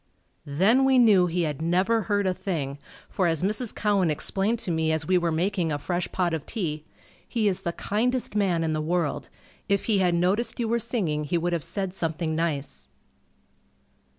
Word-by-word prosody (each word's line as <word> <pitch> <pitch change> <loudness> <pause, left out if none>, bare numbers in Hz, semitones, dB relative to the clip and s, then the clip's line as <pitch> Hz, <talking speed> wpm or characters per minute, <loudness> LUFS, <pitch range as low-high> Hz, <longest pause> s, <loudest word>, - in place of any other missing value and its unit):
Then 195 - +3
we 265 -1 +4
knew 205 -7 +6
he 175 +1 0
had 150 -2 -3
never 185 +7 +2
heard 205 +1 0
a 185 - +2
thing, 145 -8 -4 0.3
for, 185 - 0
as 165 -1 0
Mrs. 215 +4 0
Cowan 200 -5 +2
explained 195 +8 0
to 180 - -2
me 160 -1 +1
as 160 -1 0
we 185 - +2
were 170 -2 +2
making 175 0 0
a 145 - 0
fresh 175 +4 -3
pot 175 -3 0
of 160 -3 -4
tea, 155 -9 -3 0.4
"He 225 -4 0
is 190 -3 0
the 170 - -2
kindest 235 +5 -1
man 185 -5 +1
in 160 -1 0
the 155 - -1
world. 160 -2 -1 0.4
If 200 -1 +1
he 210 -3 +2
had 180 -2 +2
noticed 200 +8 0
you 235 - 0
were 235 +1 +1
singing 160 -11 -2
he 170 +4 0
would 175 +1 -1
have 165 -3 -1
said 190 +1 -3
something 165 -2 -2
nice." 145 -4 -3
180 Hz, 195 wpm, -26 LUFS, 160-205 Hz, 0.4 s, knew